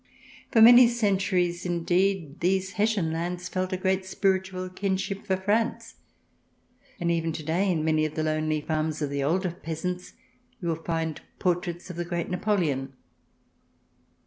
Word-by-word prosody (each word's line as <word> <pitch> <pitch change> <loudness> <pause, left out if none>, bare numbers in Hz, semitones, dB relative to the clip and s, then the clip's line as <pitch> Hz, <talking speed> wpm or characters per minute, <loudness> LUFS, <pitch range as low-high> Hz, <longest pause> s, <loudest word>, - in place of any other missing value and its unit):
For 225 -2 +6
many 240 +1 +9
centuries, 190 -6 +1
indeed, 175 -2 0
these 190 +2 +1
Hessian 210 -6 +1
lands 175 +2 -3
felt 185 +2 -2
a 185 - -1
great 190 +1 0
spiritual 190 -1 -1
kinship 195 +2 -3
for 190 -2 +1
France, 215 +5 -1 1.0
and 170 0 0
even 165 -1 0
to 155 - -6
day 180 +5 +1
in 160 -3 0
many 155 -1 +2
of 155 - -4
the 155 - -1
lonely 155 0 0
farms 155 0 -2
of 140 - -2
the 140 -1 -1
older 180 +5 +1
peasants 175 +2 -5 0.5
you 170 - -3
will 165 0 -3
find 165 -2 -2 0.2
portraits 175 0 -2
of 175 - -10
the 175 - -1
great 170 0 -3
Napo 205 +3 +1
leon. 135 -6 -1
180 Hz, 155 wpm, -26 LUFS, 160-190 Hz, 1.0 s, many